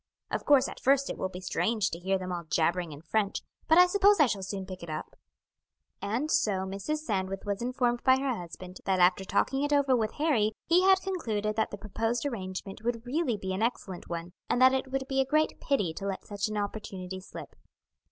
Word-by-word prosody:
Of - - -2
course 280 -3 +5
at - - -8
first 275 +1 +3
it - - -6
will 190 - -1
be 180 - -8
strange 210 +3 0
to 170 - -5
hear 190 +2 0
them 185 -1 -5
all 175 -1 -4
jabbering 170 +1 0
in 145 0 -9
French, 200 +4 -1 0.2
but 320 - +5
I 360 - +9
suppose 405 +1 +4
I 300 - +7
shall 205 -6 -2
soon 190 0 -4
pick 185 -1 -8
it 170 - -8
up." 155 0 -5 0.9
And 235 +10 -1
so 195 -10 +2
Mrs. 200 +11 -3
Sandwith 195 -3 -2
was 200 +1 -2
informed 245 -1 0
by 260 0 +5
her 265 -2 -1
husband 180 0 -9
that 190 -1 +2
after 180 +1 +4
talking 270 +7 0
it 290 0 0
over 280 -3 +4
with 220 -3 0
Harry 255 -9 +1
he 345 +2 +4
had 380 0 +6
concluded 220 - -2
that 220 - +1
the 205 - -7
proposed 225 +4 -2
arrangement 195 -5 -5
would 235 0 -2
really 260 -3 0
be 190 -1 -4
an 190 - -3
excellent 215 -6 -3
one, 170 +1 -5 0.2
and - - +2
that 260 +1 +7
it 265 0 -1
would 265 0 -2
be 270 0 +1
a - - +4
great 305 +4 +1
pity 205 - 0
to 195 +4 -5
let 195 -1 -4
such 205 +1 -2
an 215 0 -4
opportunity 195 -3 -4
slip. - - -10
215 Hz, 220 wpm, -29 LUFS, 190-265 Hz, 0.9 s, I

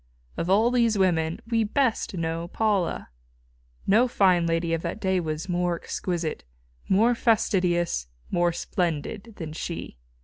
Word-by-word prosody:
Of 170 - -3
all 220 +5 +4
these 235 -3 +2
women 165 -4 +1
we 225 -1 +2
best 230 -2 0
know 165 0 -2
Paula. 205 -2 0 0.8
No 225 +6 +4
fine 180 -7 +3
lady 165 0 0
of 165 - 0
that - - -4
day 190 -3 +1
was 155 +1 -3
more 175 -1 0
exquisite, 170 -2 -3 0.5
more 225 +6 +4
fastidious, 180 - +1 0.2
more 175 0 +2
splendid 180 +5 -3
than 160 -5 -6
she. 165 - -6
180 Hz, 135 wpm, -26 LUFS, 165-215 Hz, 0.8 s, all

